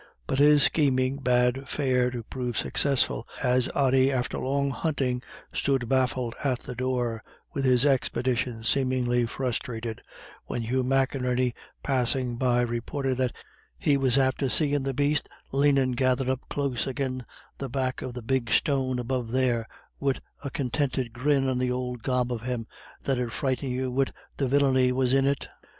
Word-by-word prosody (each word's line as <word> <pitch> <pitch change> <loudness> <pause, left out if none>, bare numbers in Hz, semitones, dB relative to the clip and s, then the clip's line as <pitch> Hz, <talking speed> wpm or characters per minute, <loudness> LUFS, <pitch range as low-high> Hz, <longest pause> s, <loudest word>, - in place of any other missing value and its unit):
But 135 - -1
his 145 0 +6
scheming 130 -3 +2
bade 125 0 +1
fair 130 -3 +1
to 120 -2 -5
prove 125 0 -4
successful, 135 -4 +1 0.2
as 125 -1 +2
Ody 135 -1 +4
after 125 -2 -1
long 140 +1 0
hunting 130 -4 -1 0.3
stood 135 -4 0
baffled 130 -2 +1
at 130 -3 +1
the - - -6
door, 120 -2 -1 0.3
with 135 - -1
his 125 +1 +4
expedition 125 -3 0
seemingly 125 -1 +2
frustrated, 115 -2 -3 0.4
when 120 - -3
Hugh 130 +3 0
McInerney 130 -1 +1 0.3
passing 130 -2 0
by 125 0 +2
reported 125 +3 -2
that 130 -2 0 0.4
he 145 - +2
"was 135 -2 +2
after 135 0 +2
seein' 145 0 +2
the 135 0 -2
baste 145 +1 +1 0.2
lanin' 140 -1 +3
gathered 130 +1 +1
up 130 -1 0
close 140 -4 -1
agin 130 -1 -2 0.4
the 135 - -4
back 130 0 -2
of 125 -2 -5
the 125 - -6
big 125 0 0
stone 130 -3 +1
above 125 -1 -2
there, 120 -3 +1 0.3
wid 135 -1 0 0.2
a 140 - -3
continted 130 -2 -1
grin 135 +2 +2
on 130 -1 0
the 125 0 +1
ould 125 -1 -3
gob 125 0 0
of 115 - -4
him 120 -1 -3 0.4
that 135 -2 0
'ud 120 -2 -2
frighten 130 0 -1
you 130 0 -2
wid 135 +1 +1 0.3
the 135 - 0
villiny 130 -1 +3
was 130 0 +1
in 135 0 +4
it." 140 0 -1
130 Hz, 160 wpm, -27 LUFS, 125-135 Hz, 0.4 s, his